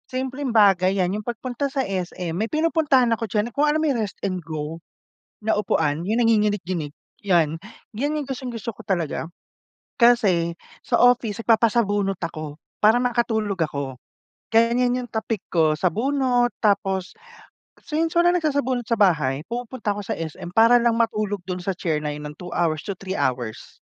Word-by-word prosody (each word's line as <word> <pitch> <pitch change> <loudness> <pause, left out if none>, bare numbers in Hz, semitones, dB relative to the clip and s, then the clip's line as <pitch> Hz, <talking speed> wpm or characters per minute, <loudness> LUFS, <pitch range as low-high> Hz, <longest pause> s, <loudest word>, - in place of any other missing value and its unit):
Simpleng 260 +2 -3
bagay 195 -2 +4
'yan 185 0 +1
yung - - -20
pagpunta 250 +4 -3
sa 270 -1 -1
SM. 180 -3 -4
May 215 +6 -2
pinupuntahan 305 -6 +2
ako 225 0 -2
diyan, 210 +3 -1
kung 295 +1 +2
alam 305 +1 +2
mo - - +1
may 290 - +2
Rest 205 -1 -4
N 185 -2 -1
Go 155 0 -5 0.6
na 220 +1 +1
upuan 160 -5 0
yung 225 +4 +1
nanginginig-nginig 200 -9 +1 0.3
'yan. 165 -5 +2 0.4
'Yan 290 +6 -1
yung - - -9
gustong-gusto 245 -4 -4
ko - - -11
talaga. 170 -4 -1 0.7
Kasi 205 -9 +4 0.3
sa - - +1
office 245 -4 +3
nagpapasabunot 210 -4 +2
ako 155 -3 -6 0.2
para 220 +3 +6
makatulog 230 -5 0
ako, 140 -4 -3 0.5
kaya 230 +1 +4
yan 250 +1 +1
yung 245 - -10
tapik 220 -2 -3
ko, 160 -3 +3
sabunot 245 - +1
tapos 195 -3 +1 0.7
since 325 +1 -1
walang 350 +1 +4
nagsasabunot 265 -6 -1
sa 230 - +2
bahay 150 -9 +2
pumupunta 240 -2 -3
ako 205 0 -4
sa - - -1
SM 165 +2 -7
para 230 +2 +6
lang 235 -1 +2
matulog 215 -4 -1
dun 180 0 -4
sa 185 +1 -3
chair 160 -4 -1
na 150 -1 -3
yun 150 0 -7
ng 150 - -16
2 180 - -8
hours 165 -3 +1
to 200 - -3
3 190 +1 -5
hours. 125 -4 -3
210 Hz, 165 wpm, -23 LUFS, 175-245 Hz, 0.7 s, para